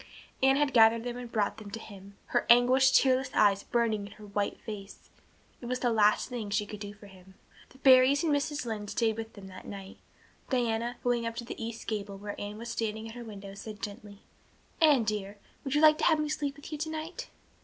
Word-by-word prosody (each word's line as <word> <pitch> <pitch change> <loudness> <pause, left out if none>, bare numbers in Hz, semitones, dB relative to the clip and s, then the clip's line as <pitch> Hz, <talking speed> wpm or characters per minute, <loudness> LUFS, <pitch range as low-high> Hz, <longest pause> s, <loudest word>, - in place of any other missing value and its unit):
Anne 265 0 +5
had 290 -1 +1
gathered 225 0 +6
them 245 0 -4
and 245 -1 -8
brought 210 -2 0
them 215 -2 -9
to 200 - -6
him, 200 -2 -12
her - - 0
anguished, 255 +2 +6
tearless 260 -1 +4
eyes 200 -1 +4
burning 220 -4 0
in 205 - -13
her 215 0 -13
white 200 0 -2
face. 205 -3 -9 0.5
It 240 - -7
was 250 +1 -2
the 245 - +2
last 215 -1 +3
thing 235 -5 -5
she 205 +1 0
could 210 0 -8
do 205 -1 -6
for 205 0 -15
him. 190 -1 -16 0.3
The - - -18
Barrys 265 +2 +6
and 315 -3 +2
Mrs. 290 -1 -1
Lynde 210 -3 -4
stayed 225 0 +1
with 225 0 -7
them 200 -2 -11
that 185 0 -11
night. 195 -1 -9 0.5
Diana, 240 -2 0
going 235 -2 0
to 235 +1 -7
the 230 - -7
east 230 0 -6
gable, 205 -2 -4
where 205 +1 -6
Anne 205 +1 -5
was 235 +1 -7
standing 220 -1 -3
at - - -9
her 240 - -7
window, 200 -3 -9
said 210 +1 -9
gently: 205 -1 -8 0.6
"Anne 295 -7 +6
dear, 205 -1 -3 0.3
would 270 0 -2
you 295 - +3
like 310 -1 +6
to - - +1
have 320 -2 +5
me 305 0 -1
sleep 285 -2 -2
with 290 +2 -11
you 305 - -4
tonight?" 320 +9 -5
225 Hz, 220 wpm, -29 LUFS, 205-260 Hz, 0.6 s, gathered